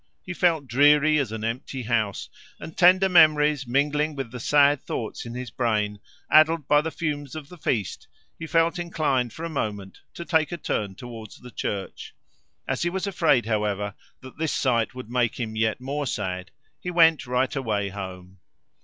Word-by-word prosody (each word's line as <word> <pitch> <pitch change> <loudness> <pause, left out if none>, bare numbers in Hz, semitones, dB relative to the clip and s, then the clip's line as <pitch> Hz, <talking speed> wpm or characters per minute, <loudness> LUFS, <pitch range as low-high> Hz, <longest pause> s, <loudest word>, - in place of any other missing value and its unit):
He 185 - -5
felt 165 -4 +1
dreary 150 +4 +4
as 130 -6 -2
an 110 -1 -5
empty 125 +3 -4
house; 110 -3 -1 0.3
and 160 - -9
tender 185 +1 +5
memories 150 -5 +4
mingling 150 +4 +1
with 135 -5 -5
the 125 - -7
sad 145 +2 +4
thoughts 115 +2 -5
in 120 - -7
his 125 -2 -6
brain, 105 -4 -1 0.3
addled 155 -1 +5
by 145 0 +5
the 160 - -3
fumes 150 -4 -4
of 155 -2 -8
the 180 - -12
feast, 110 -9 -2 0.3
he 160 - -6
felt 165 +3 +2
inclined 150 -8 0
for 165 +8 -7
a - - -2
moment 105 -10 -4 0.2
to 170 - -7
take 160 -2 +1
a 175 - -3
turn 105 - -3
towards 115 -2 -10
the 125 - -13
church. 100 -3 -5 0.5
As 130 - -2
he 175 - +1
was 190 +2 -3
afraid, 165 - +2
however, 105 -2 -1 0.3
that 130 +1 -13
this 160 -2 0
sight 120 -3 0
would 125 -3 -9
make 120 -1 0
him 110 -2 -4
yet 110 +1 0
more 140 +2 -3
sad, 95 -4 -3 0.3
he 180 - -5
went 165 -5 +4
right 125 +2 0
away 105 -7 -1
home. 95 -1 -8
130 Hz, 180 wpm, -25 LUFS, 110-155 Hz, 0.5 s, tender